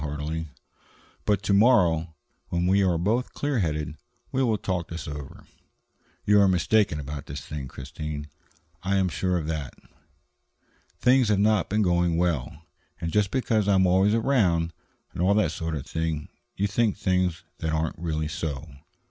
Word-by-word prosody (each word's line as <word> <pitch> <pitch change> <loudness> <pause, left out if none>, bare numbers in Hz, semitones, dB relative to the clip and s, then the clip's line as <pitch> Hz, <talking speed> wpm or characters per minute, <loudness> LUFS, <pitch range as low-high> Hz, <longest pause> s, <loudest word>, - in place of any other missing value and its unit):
heartily. 75 +2 -3 0.8
"But 105 -2 +1
to 100 - +1
morrow, 90 -8 +4 0.3
when 85 0 -1
we 95 +2 +4
are 90 -3 +2
both 110 +9 0
clear 145 -4 -1
headed, 75 -3 -2 0.3
we 130 - 0
will 115 -4 +2
talk 90 -3 -2
this 85 -3 -6
over. 75 -2 -8 0.8
You 105 0 +5
are 100 - +5
mistaken 95 -1 +2
about 70 0 -6
this 70 +1 -6
thing, 75 -3 -6
Christine; 75 +3 -6 0.5
I 95 +2 0
am 95 -1 +2
sure 90 +1 0
of 80 - -3
that. 75 -4 -4 1.2
Things 125 -2 +4
have 105 - +3
not 105 +1 +2
been 105 +2 +2
going 85 -2 +2
well, 80 -3 -1 0.4
and 85 - -3
just 105 -2 +3
because 110 -5 +1
I 100 - +4
am 95 0 +4
always 95 +4 +4
around, 95 -10 +2 0.4
and - - -4
all 95 +3 +4
that 95 -7 +2
sort 80 -1 -3
of 70 - -5
thing, 80 -2 -3 0.3
you 100 - 0
think 105 +1 +1
things 90 -3 0 0.2
that 80 -1 -1
aren't 80 +1 -1
really 80 -2 -2
so. 75 -1 -4
85 Hz, 165 wpm, -26 LUFS, 80-100 Hz, 1.2 s, You